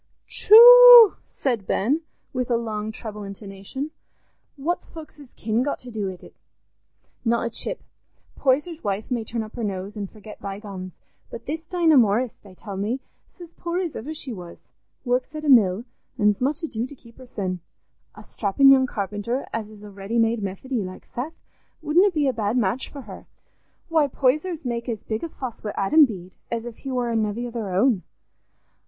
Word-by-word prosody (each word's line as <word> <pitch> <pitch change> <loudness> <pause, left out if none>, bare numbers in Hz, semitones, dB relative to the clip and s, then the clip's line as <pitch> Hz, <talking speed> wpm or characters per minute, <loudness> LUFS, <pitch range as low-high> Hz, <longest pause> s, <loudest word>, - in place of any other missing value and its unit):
"Tchu!" 485 0 +9
said 235 -8 -3
Ben, 275 +11 +1 0.3
with 250 -1 -2
a 235 - +2
long 215 -2 -4
treble 215 -1 -8
intonation, 200 +8 -7 0.6
"what's 315 +5 -3
folks's 305 -4 -12
kin 220 +2 -1
got 285 +2 -1
to 250 - -12
do 210 -3 -3
wi't? 185 -2 -9 0.9
Not 235 0 +1
a - - -1
chip. - - -5 0.5
Poyser's 300 +5 0
wife 205 +4 -3
may 240 -2 -1
turn 225 +1 -4
her 220 +2 -7
nose 195 0 -4
up 210 - -5
an' 200 - -4
forget 215 +1 -13
bygones, 195 -2 -7 0.4
but 230 0 -9
this 320 +3 -5
Dinah 330 -4 +3
Morris, 230 +1 +3
they 195 -3 -16
tell 200 0 -8
me, 215 +7 -2 0.4
's - - -18
as 340 -1 -11
poor 340 +1 -4
as 355 -4 -3
iver 280 +8 -6
she 270 -5 -6
was—works 245 - -6
at 305 0 -5
a - - 0
mill, 215 -4 +5 0.3
an's 210 +1 +2
much 290 +6 -1
ado 240 -6 -3
to 285 - -12
keep 235 -2 -19
hersen. 195 -8 -4 0.6
A - - -12
strappin' 230 +7 +3
young 260 -1 +5
carpenter 210 +4 -3
as 220 -2 -4
is 210 -1 -14
a 205 - -10
ready 200 +4 -4
made 225 0 +2
Methody, 210 +6 -3
like 185 0 -9
Seth, 290 +7 -6 0.4
wouldna 345 +6 +4
be 305 -6 0
a 265 - +1
bad 220 +1 -1
match 235 +3 -1
for 280 - -9
her. - - -11 0.6
Why, 320 -3 +2
Poysers 300 +5 0
make 235 0 -3
as 225 -3 -4
big 220 0 -4
a 335 - -4
fuss 255 -6 -8
wi' 210 - -4
Adam 295 +10 +5
Bede 185 -7 -9
as 230 0 -3
if 240 -2 -8
he 270 - -6
war 245 -2 -1
a - - -1
nevvy 220 +2 -1
o' - - -8
their 225 -4 -4
own." 195 +2 +2
235 Hz, 185 wpm, -23 LUFS, 210-280 Hz, 0.9 s, Tchu